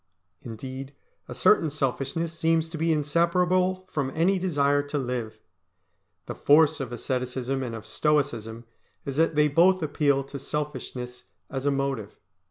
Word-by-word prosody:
Indeed 130 Hz, +4 st, -8 dB, 0.3 s
a -, -, -6 dB
certain 160 Hz, -, +4 dB
selfishness 145 Hz, +3 st, -2 dB
seems 165 Hz, 0 st, +1 dB
to 160 Hz, -, -6 dB
be 165 Hz, +1 st, +2 dB
inseparable 180 Hz, +4 st, +1 dB
from 140 Hz, -6 st, -2 dB
any 185 Hz, +4 st, +2 dB
desire 145 Hz, -6 st, +2 dB
to 145 Hz, +1 st, -4 dB
live. 120 Hz, -5 st, -3 dB, 0.9 s
The -, -, -5 dB
force 155 Hz, +1 st, +4 dB
of 130 Hz, -3 st, -4 dB
asceticism 125 Hz, +2 st, -2 dB
and 120 Hz, -3 st, -4 dB
of 110 Hz, -, -8 dB
Stoicism 120 Hz, -7 st, -1 dB, 0.4 s
is 140 Hz, 0 st, -4 dB
that 165 Hz, 0 st, +2 dB
they 150 Hz, 0 st, +4 dB
both 175 Hz, +5 st, +4 dB
appeal 145 Hz, -2 st, +1 dB
to 140 Hz, +1 st, -8 dB
selfishness 130 Hz, -4 st, -5 dB, 0.3 s
as 135 Hz, +1 st, -2 dB
a -, -, +4 dB
motive. 135 Hz, -6 st, -2 dB
145 Hz, 145 wpm, -26 LUFS, 130-160 Hz, 0.9 s, certain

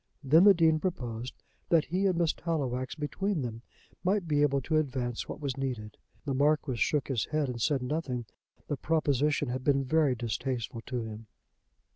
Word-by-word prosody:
Then 155 Hz, +7 st, +6 dB
the 200 Hz, -2 st, +8 dB
Dean 160 Hz, -2 st, +4 dB
proposed 125 Hz, -9 st, -4 dB, 0.3 s
that 165 Hz, -3 st, +4 dB
he 190 Hz, +4 st, +1 dB
and 185 Hz, -3 st, +1 dB
Miss 170 Hz, -2 st, +2 dB
Tallowax 130 Hz, -6 st, -2 dB
between 160 Hz, +2 st, -2 dB
them 115 Hz, -1 st, -5 dB, 0.4 s
might 190 Hz, -1 st, +1 dB
be 145 Hz, -2 st, +2 dB
able 140 Hz, -1 st, +3 dB
to 155 Hz, +4 st, 0 dB
advance 130 Hz, -5 st, -2 dB
what -, -, -5 dB
was 140 Hz, -3 st, -3 dB
needed. 120 Hz, -6 st, -4 dB, 0.3 s
The 140 Hz, -, -1 dB
Marquis 145 Hz, -1 st, +2 dB
shook 145 Hz, +3 st, +1 dB
his 130 Hz, -5 st, 0 dB
head 155 Hz, -2 st, 0 dB
and 120 Hz, -2 st, -5 dB
said 135 Hz, 0 st, +1 dB
nothing. 125 Hz, -3 st, -2 dB, 0.4 s
The 145 Hz, -, -2 dB
proposition 145 Hz, -2 st, +1 dB
had 130 Hz, +1 st, -3 dB
been 140 Hz, -1 st, +3 dB
very 145 Hz, -1 st, +3 dB
distasteful 120 Hz, 0 st, -3 dB
to 125 Hz, -2 st, -2 dB
him. 110 Hz, 0 st, -8 dB
140 Hz, 175 wpm, -30 LUFS, 125-155 Hz, 0.4 s, the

